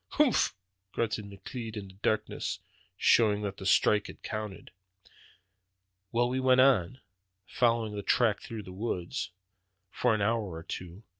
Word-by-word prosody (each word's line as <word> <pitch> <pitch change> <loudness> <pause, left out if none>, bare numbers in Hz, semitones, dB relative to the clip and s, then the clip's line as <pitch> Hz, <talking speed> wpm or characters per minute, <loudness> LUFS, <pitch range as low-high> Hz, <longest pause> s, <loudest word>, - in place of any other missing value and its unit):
"Humph!" 295 - +3 0.4
grunted 110 -2 -1
McLeod 110 +3 -7
in 100 -2 -6
the - - -14
darkness, 110 +2 -1 0.4
showing 105 -3 +4
that 100 -1 -3
the 95 - -4
strike 105 +2 +4
had - - -12
counted. 105 -3 -5 1.4
"Well, 120 +1 +2
we 130 +1 -1
went 130 0 +4
on, 130 -3 +3 0.4
following 115 -2 +1
that 100 - -6
track 115 -4 +3
through 110 -2 -7
the 95 - -10
woods, 95 -3 -3 0.6
for 120 -3 +2
an 105 - -2
hour 115 +2 +2
or 80 -4 -7
two. 90 +4 -7
110 Hz, 145 wpm, -30 LUFS, 100-115 Hz, 1.4 s, showing